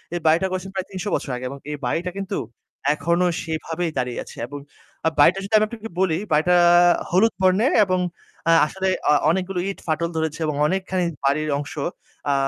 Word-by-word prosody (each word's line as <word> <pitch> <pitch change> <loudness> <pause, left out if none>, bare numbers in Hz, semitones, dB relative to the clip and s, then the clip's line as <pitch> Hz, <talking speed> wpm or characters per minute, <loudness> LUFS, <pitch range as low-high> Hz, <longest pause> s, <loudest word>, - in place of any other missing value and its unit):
এই - - -1
বাড়িটা 165 +4 +4
করেছেন 185 +1 -4
প্রায় 190 0 -3
৩০০ 185 -2 -5
বছর 135 - -4
আগে 125 - -6
এবং 140 - -7
এই 150 - -4
বাড়িটা 170 +8 -1
কিন্তু 195 0 -3 0.6
এখনো 170 +3 +1 0.2
সেইভাবেই 160 +1 -3
দাঁড়িয়ে 125 -1 -2
আছে। - - -13
এবং 145 +2 -7 0.6
বাড়িটা 175 +7 +6
যদি 200 +3 -7
আমি 215 - +4
আপনাকে 225 -1 -8
বলি, 170 -4 +2
বাড়িটা 160 +4 +4 0.6
হলুদ 205 +6 +4
বর্ণের 190 +9 +3
এবং 185 -1 0 0.5
আ - - +7 0.2
আসলে 190 +3 -3 0.2
অ - - +6 0.2
অনেকগুলো 185 +2 -1
ইট 195 - -6
ফাটল 165 +1 0
ধরেছে 160 -1 -2
এবং 150 -1 -1
অনেকখানি 185 0 -1 0.2
বাড়ির 155 +2 +1
অংশ 145 - -6 0.6
আ - - +3
175 Hz, 180 wpm, -22 LUFS, 155-190 Hz, 0.6 s, আ